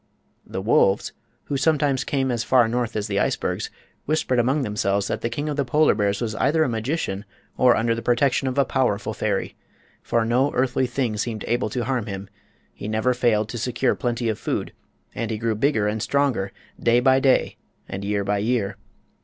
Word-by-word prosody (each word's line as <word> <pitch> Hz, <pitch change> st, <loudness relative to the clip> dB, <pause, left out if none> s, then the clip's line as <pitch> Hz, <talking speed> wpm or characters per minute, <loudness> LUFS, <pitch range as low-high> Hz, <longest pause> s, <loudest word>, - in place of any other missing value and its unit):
The 95 Hz, -, -5 dB
wolves, 100 Hz, -2 st, +3 dB, 0.3 s
who 140 Hz, -, -2 dB
sometimes 145 Hz, -3 st, +2 dB
came 135 Hz, -2 st, 0 dB
as 120 Hz, -1 st, -1 dB
far 125 Hz, -2 st, +4 dB
north 120 Hz, 0 st, -2 dB
as 105 Hz, -1 st, -1 dB
the 100 Hz, -2 st, -1 dB
icebergs, -, -, -1 dB, 0.4 s
whispered 145 Hz, -4 st, +1 dB
among 135 Hz, +4 st, +2 dB
themselves 100 Hz, -3 st, 0 dB
that -, -, -2 dB
the 115 Hz, -, -1 dB
King 145 Hz, +6 st, -3 dB
of 150 Hz, -1 st, -2 dB
the 140 Hz, -, +2 dB
Polar 150 Hz, +4 st, +3 dB
Bears 100 Hz, 0 st, 0 dB
was 115 Hz, -2 st, -2 dB
either 155 Hz, +6 st, +3 dB
a -, -, +1 dB
magician 115 Hz, -3 st, -2 dB, 0.3 s
or 125 Hz, -1 st, +5 dB
under 115 Hz, +1 st, +1 dB
the 115 Hz, -, -4 dB
protection 125 Hz, +3 st, +2 dB
of 130 Hz, +1 st, -2 dB
a 140 Hz, -, +4 dB
powerful 125 Hz, -7 st, 0 dB
fairy. -, -, -2 dB, 0.5 s
For 115 Hz, -1 st, 0 dB
no 125 Hz, +5 st, +2 dB
earthly 130 Hz, 0 st, +1 dB
thing 120 Hz, -3 st, -1 dB
seemed 110 Hz, -1 st, -3 dB
able 120 Hz, -2 st, 0 dB
to 120 Hz, +3 st, -2 dB
harm 120 Hz, -2 st, -1 dB
him; 95 Hz, -1 st, -6 dB, 0.4 s
he -, -, -7 dB
never 110 Hz, +4 st, +1 dB
failed 115 Hz, -4 st, +2 dB
to 120 Hz, -, -5 dB
secure 125 Hz, +2 st, +1 dB
plenty 120 Hz, -2 st, -2 dB
of 110 Hz, -2 st, -1 dB
food, -, -, -3 dB, 0.4 s
and 115 Hz, -, -3 dB
he 110 Hz, -, -2 dB
grew 115 Hz, +1 st, 0 dB
bigger 110 Hz, -2 st, +1 dB
and 105 Hz, +1 st, -2 dB
stronger 130 Hz, -7 st, 0 dB, 0.3 s
day 120 Hz, +1 st, +4 dB
by 130 Hz, +1 st, +4 dB
day 135 Hz, -1 st, +2 dB, 0.3 s
and 95 Hz, +1 st, -5 dB
year 100 Hz, 0 st, 0 dB
by 100 Hz, +1 st, 0 dB
year. 110 Hz, -2 st, -1 dB
120 Hz, 195 wpm, -23 LUFS, 105-130 Hz, 0.5 s, or